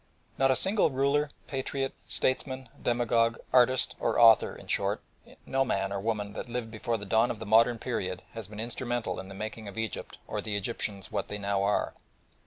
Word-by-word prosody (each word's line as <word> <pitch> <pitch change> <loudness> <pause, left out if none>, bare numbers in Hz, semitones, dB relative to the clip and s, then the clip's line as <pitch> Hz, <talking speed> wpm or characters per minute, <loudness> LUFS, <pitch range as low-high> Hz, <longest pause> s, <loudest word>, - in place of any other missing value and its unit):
Not 135 0 +3
a 130 - +4
single 195 - +3
ruler, 140 +2 +2 0.2
patriot, 135 0 -2
statesman, 130 -1 0
demagogue, 115 -1 +2 0.2
artist 130 0 +4
or - - +1
author, 115 -2 +7
in - - -12
short, - - 0 0.5
no 135 0 +2
man 100 -6 -1
or 100 - -2
woman 105 -1 -2
that 120 - -6
lived 120 -2 -3
before 115 +1 -2
the 105 - -7
dawn 110 +4 +3
of - - -3
the 110 - -7
modern 115 +3 +5
period, 95 -7 -3
has 115 -4 -6
been 105 +1 -9
instrumental 120 -3 -2
in 95 - -7
the 100 - -9
making 110 +1 -6
of 100 - -9
Egypt 110 -4 -4
or - - -3
the 105 - -3
Egyptians 100 -2 -2
what 100 -2 -2
they 105 - -4
now 100 -1 0
are. 100 +1 +1
115 Hz, 195 wpm, -29 LUFS, 105-125 Hz, 0.5 s, author